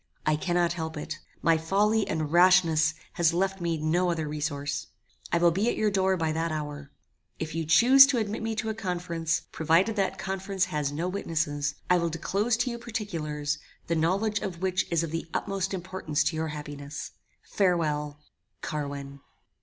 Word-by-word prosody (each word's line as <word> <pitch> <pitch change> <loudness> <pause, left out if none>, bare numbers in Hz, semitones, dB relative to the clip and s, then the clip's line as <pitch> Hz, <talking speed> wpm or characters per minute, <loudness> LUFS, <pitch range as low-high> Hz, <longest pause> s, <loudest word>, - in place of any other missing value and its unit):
I 155 - +3
cannot 175 +2 +1
help 160 -2 -5
it. 155 +1 -5 0.2
My 165 -1 +4
folly 205 +6 +2
and 155 -2 -2
rashness 170 -3 +5 0.2
has 170 -1 +2
left 195 +1 0
me 170 -1 0
no 165 +4 +1
other 160 -3 -1
resource. 145 -1 -3 0.4
I 170 - +3
will 170 0 +4
be 200 +7 +1
at - - -1
your 215 -1 +2
door 190 -1 +2
by 160 -2 0
that 165 +1 -1
hour. 150 -2 -5 0.5
If 160 0 -4
you 165 0 -2
chuse 255 - +8
to 265 - +1
admit 215 -1 -2
me 225 0 -2
to 220 +1 -2
a - - -1
conference, 175 -6 -2
provided 165 +7 +2
that 195 -1 0
conference 190 0 -1
has 150 -2 0
no 160 +5 -2
witnesses, 155 -6 -1
I 180 -1 +4
will 170 0 0
disclose 200 +8 0
to 245 +1 0
you 235 - -5
particulars, 160 -11 -3 0.3
the 170 - 0
knowledge 195 +6 +1
of 175 -3 -5
which 190 0 +1
is 170 -1 +2
of 165 - -4
the 165 +1 -3
utmost 195 -1 -1
importance 185 -5 -2
to 160 - -1
your 160 0 -1
happiness. 145 -1 -7 0.3
Farewell. 150 -6 0 0.4
"CARWIN." 140 -2 -4
170 Hz, 175 wpm, -27 LUFS, 155-195 Hz, 0.5 s, chuse